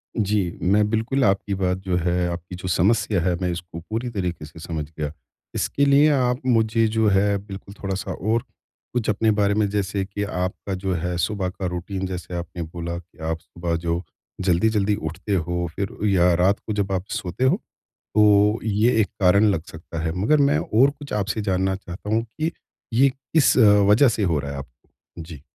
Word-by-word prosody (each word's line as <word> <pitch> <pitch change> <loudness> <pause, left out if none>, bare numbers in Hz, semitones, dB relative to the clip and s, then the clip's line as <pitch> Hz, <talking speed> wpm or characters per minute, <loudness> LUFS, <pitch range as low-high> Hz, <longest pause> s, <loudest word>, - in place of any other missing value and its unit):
जी, 100 -5 0
मैं 105 +3 +3
बिल्कुल 115 +5 0
आपकी 100 0 +1
बात 95 -1 0
जो 90 -2 0
है, 90 0 0
आपकी 85 +1 -6
जो 90 +1 -7
समस्या 100 +2 +2
है, 90 +1 +1
मैं 90 - 0
इसको 85 -1 -6
पूरी 115 +3 -2
तरीके 90 -8 -3
से 75 - -13
समझ 80 -2 -4
गया। 75 -1 -2 0.4
इसके 140 - +1
लिए 140 +2 +5
आप 125 -2 +1
मुझे 115 -2 +3
जो 110 0 +1
है 100 +1 +3
बिल्कुल 100 0 -9
थोड़ा-सा 95 0 -3
और 110 +5 0 0.5
कुछ 120 -3 -1
अपने 110 +1 +2
बारे 100 -1 +2
में 105 0 +2
जैसे 100 -1 -1
कि 100 +1 -4
आपका 95 0 -3
जो 95 0 -2
है 90 +1 -2
सुबह 95 +2 -1
का 95 +1 -6
रूटीन 90 +2 -4
जैसे 90 -1 -6
आपने 85 0 -5
बोला 85 +1 -5
कि 85 0 -14
आप 80 0 -2
सुबह 85 +1 -4
जो 85 +1 -1 0.4
जल्दी-जल्दी 100 +3 +2
उठते 95 +4 -3
हो 85 0 -1
फ़िर 100 -1 -3
या 90 -3 +4
रात 95 +4 +2
को 110 - -1
जब 100 -1 -1
आप 95 -1 -1
सोते 110 0 -3
हो, 130 +6 +4 0.6
तो 105 +1 +5
ये 110 +2 +2
एक 105 - +1
कारण 100 +2 +5
लग 80 -5 -2
सकता 80 0 -8
है। 80 - 0
मगर 110 +11 +3
मैं 145 - +3
और 125 +6 +3
कुछ 145 0 -10
आपसे 105 +1 -1
जानना 95 -1 0
चाहता 95 +1 -8
हूँ 110 +1 +2
कि 155 +8 -3 0.4
ये 135 +4 +5
किस 135 +3 +1
वजह 105 +2 +6
से 110 -2 -1
हो 85 -6 +1
रहा 70 0 -5
है 70 - -6
आपको? 65 -3 -12 0.3
जी। 80 -3 -9
100 Hz, 195 wpm, -23 LUFS, 90-110 Hz, 0.6 s, वजह